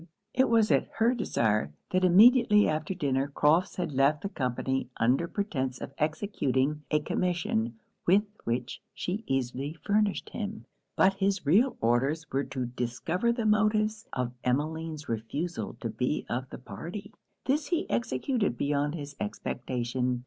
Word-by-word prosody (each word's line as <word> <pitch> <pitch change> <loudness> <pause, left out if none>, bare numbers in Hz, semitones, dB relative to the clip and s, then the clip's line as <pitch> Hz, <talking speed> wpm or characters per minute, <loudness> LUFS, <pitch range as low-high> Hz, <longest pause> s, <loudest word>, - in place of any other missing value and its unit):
It 260 +1 +3
was 225 -2 +4
at - - +2
her 230 +2 +3
desire, 110 - 0 0.2
that 185 0 +2
immediately 210 +3 +6
after 155 +4 -1
dinner 140 -5 0
Crofts 150 +5 +2
had 175 -4 -2
left 140 +2 +2
the 200 - -2
company 130 - -2
under 130 +9 +2
pretence 135 -11 -2
of - - -7
executing 150 -4 0
a 150 - +3
commission 150 -9 -1 0.3
with 195 +4 +5 0.2
which 120 +1 -3
she 195 +5 -3
easily 135 +3 -2
furnished 205 -1 +1
him; 215 -1 -5 0.3
but 195 - +5
his 195 -2 0
real 220 - +4
orders 135 +8 +1
were 135 +1 0
to 130 -2 -3
discover 125 - -1
the 235 -1 -2
motives 215 0 +2
of 125 -1 -2
Emmeline's 155 +4 -2
refusal 130 +10 -3
to 115 - -2
be 125 +7 -1
of 130 +2 -3
the - - -7
party. 190 +10 -8 0.3
This 285 +2 +1
he 340 0 0
executed 130 - 0
beyond 145 +3 0
his 145 -2 -7
expectation. 125 - -2
155 Hz, 145 wpm, -29 LUFS, 130-205 Hz, 0.3 s, immediately